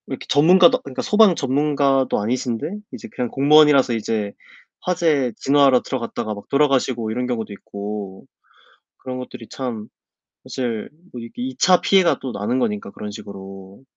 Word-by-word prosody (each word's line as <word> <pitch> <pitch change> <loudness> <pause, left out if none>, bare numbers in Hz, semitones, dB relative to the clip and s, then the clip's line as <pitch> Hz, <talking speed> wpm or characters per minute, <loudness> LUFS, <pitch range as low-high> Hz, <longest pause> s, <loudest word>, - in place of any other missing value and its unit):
이렇게 - - -6
전문가도, 170 +5 +5
그니까 135 -2 -6
소방 210 -4 +4
전문가도 140 -1 +1
아니신데 120 +4 -2 0.3
이제 - - -8
그냥 125 -1 -2
공무원이라서 140 -2 +5
이제 110 -2 -2 0.5
화재 160 -8 +1
진화하러 140 -2 +4
들어갔다가 115 -4 -4
막 100 - -11
돌아가시고 130 -5 +1
이런 125 +2 -2
경우도 115 -4 -4
있고 100 -1 -7 0.7
그런 130 0 -7
것들이 125 -3 -9
참 115 -5 -5 0.6
사실 120 -4 -4 0.2
뭐 125 - -7
이렇게 115 +1 -8
2 130 0 -5
차 180 +5 +4
피해가 190 -3 +3
또 130 -2 -5
나는 115 +5 -2
거니까 105 -5 -2
그런 105 +1 -8
식으로. 95 -1 -11
125 Hz, 355 characters per minute, -21 LUFS, 110-140 Hz, 0.7 s, 전문가도